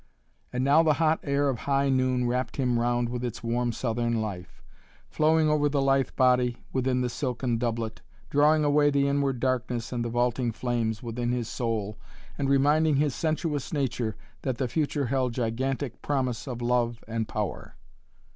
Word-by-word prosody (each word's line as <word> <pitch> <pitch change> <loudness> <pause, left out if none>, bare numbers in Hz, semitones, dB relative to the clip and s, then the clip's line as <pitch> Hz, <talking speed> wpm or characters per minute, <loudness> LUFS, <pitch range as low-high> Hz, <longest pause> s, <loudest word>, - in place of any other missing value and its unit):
And 125 +1 -1
now 145 +4 +5
the 155 -2 +4
hot 160 0 +2
air 140 0 +1
of 130 -4 -1
high 140 0 +2
noon 130 -1 +1
wrapped 125 +1 -2
him 125 -3 +1
round 120 0 +1
with 120 +1 -4
its 120 -1 -4
warm 120 +1 0
southern 115 0 -1
life, 95 -5 -6 0.5
flowing 155 0 +3
over 150 -1 +2
the 145 0 0
lithe 135 -1 +2
body 125 -2 +3 0.2
within 130 -1 +1
the 125 - 0
silken 125 -1 -2
doublet, 115 -2 -2 0.3
drawing 150 +2 +4
away 145 0 +4
the 140 -1 +2
inward 140 -2 0
darkness 125 -2 -1
and 120 -1 -1
the 120 - -2
vaulting 120 +1 0
flames 115 -2 -2
within 120 +1 -2
his 120 -2 -2
soul 110 -4 -3 0.4
and 140 -1 -1
reminding 145 +3 +3
his 145 -1 +2
sensuous 155 -2 -2
nature 125 -6 -1 0.3
that 130 -3 -2
the 130 - -1
future 145 +2 -1
held 130 -1 0
gigantic 130 +2 -2
promise 130 -4 -1
of 120 -2 -5
love 120 -1 0
and 110 -1 -2
power. 105 -4 -4
125 Hz, 170 wpm, -27 LUFS, 120-140 Hz, 0.5 s, now